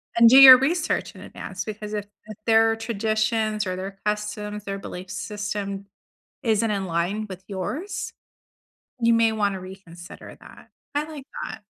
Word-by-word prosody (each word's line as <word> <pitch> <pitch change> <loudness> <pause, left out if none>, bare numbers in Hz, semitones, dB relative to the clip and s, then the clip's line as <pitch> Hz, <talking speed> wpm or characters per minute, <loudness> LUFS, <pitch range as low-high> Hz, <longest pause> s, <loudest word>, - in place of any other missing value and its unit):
and 235 0 +7
do 260 - +7
your 265 -1 +12
research 305 +7 -1
in - - -12
advance 190 0 -7
because 215 0 -6
if 205 -1 -3 0.2
if 215 -1 -10
their 225 0 +4
traditions 220 -1 -1
or 185 - -2
their 195 +1 -7
customs 210 0 -3
or 195 - -3
belief 180 -1 -8
system 200 0 -5 0.6
isn't 225 -2 +1
in 195 -2 -2
line 180 +5 -2
with 185 0 -9
yours, 215 - -5 0.9
you 230 0 +4
may 230 -1 +3
wanna 205 -3 -1
reconsider 180 -2 -12
that. - - -16 0.3
I 295 - +1
like 290 -4 -9 0.2
that. 220 - -7
210 Hz, 155 wpm, -24 LUFS, 195-225 Hz, 0.9 s, your